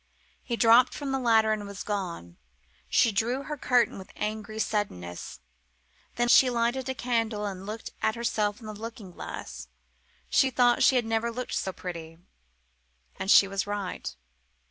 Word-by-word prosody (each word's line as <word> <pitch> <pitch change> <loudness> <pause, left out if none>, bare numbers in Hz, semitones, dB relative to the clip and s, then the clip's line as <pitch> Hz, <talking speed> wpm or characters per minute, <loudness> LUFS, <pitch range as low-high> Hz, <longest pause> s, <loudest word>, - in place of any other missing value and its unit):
He 235 - -3
dropped 230 +3 +5
from 285 -2 -4
the 270 - 0
ladder 220 -3 +4
and 205 -1 -4
was 200 -1 -7
gone. 175 - -4 0.5
She 230 - +4
drew 235 +6 0
her 300 - -4
curtain 250 -6 +2
with 190 - -11
angry 215 0 -4
suddenness. 145 - -3 0.7
Then 240 0 +1
she 255 +2 +7
lighted 245 +2 0
candles 225 -4 -1
and 190 0 -8
looked 220 +2 -6
at 220 - +1
herself 215 -3 -1
in 225 - -12
the 215 - -6
looking 220 -2 -8
glass. - - -8 0.6
She 265 - +3
thought 245 -1 +3
she 265 - +5
had 245 -2 +2
never 225 +1 0
looked 250 +2 -5
so 190 - -1
pretty. 165 -3 -7 1.0
And 190 - -3
she 200 - +8
was 195 0 -2
right. 205 -2 -4
220 Hz, 160 wpm, -27 LUFS, 200-240 Hz, 1.0 s, she